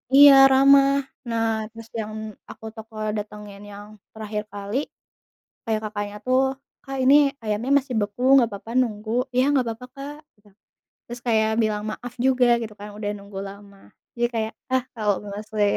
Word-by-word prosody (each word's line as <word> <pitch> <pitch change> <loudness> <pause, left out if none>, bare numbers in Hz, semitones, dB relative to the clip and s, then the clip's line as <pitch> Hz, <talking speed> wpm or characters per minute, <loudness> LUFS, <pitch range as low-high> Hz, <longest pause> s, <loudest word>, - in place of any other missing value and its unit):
Iya 285 0 +10 0.2
ramah. 275 +1 +6 0.4
Nah 225 -1 0 0.2
terus 225 0 -12
yang 215 0 -5 0.4
aku - - -12
toko 220 0 -11 0.2
datengin 210 -1 -8
yang 205 0 -10 0.3
terakhir 215 -1 -4
kali, 205 +3 -4 0.9
kayak 220 -2 -1
kakaknya 205 -1 -5
tuh, 255 +1 +3 0.4
"Kak, 270 -1 -6
ini 265 +2 +6 0.3
ayamnya 215 +4 -2
masih 260 -2 -6
beku 205 +3 -4
nggak 245 -4 +5
papa 200 +3 -9
nunggu?" 215 -3 -2 0.2
"Iya 255 +1 +3
nggak 260 -4 +2
papa, 225 +2 -7
Kak," 280 +2 -7 0.2
gitu. 205 0 -24 0.6
Terus 240 +1 -8
kayak 220 -2 +3
bilang 210 -1 -1
maaf 245 +1 -8
juga 255 -2 +4
gitu 220 -2 -6
kan, 205 +1 -8
udah 205 -1 -3
nunggu 200 0 -11
lama. 200 0 -13 0.4
Jadi 240 0 +1
kayak, 220 -1 -1 0.2
ah 260 -1 +2
kalau 210 -2 +1
males 205 +1 -7
li - - +5
220 Hz, 165 wpm, -23 LUFS, 210-250 Hz, 0.9 s, Iya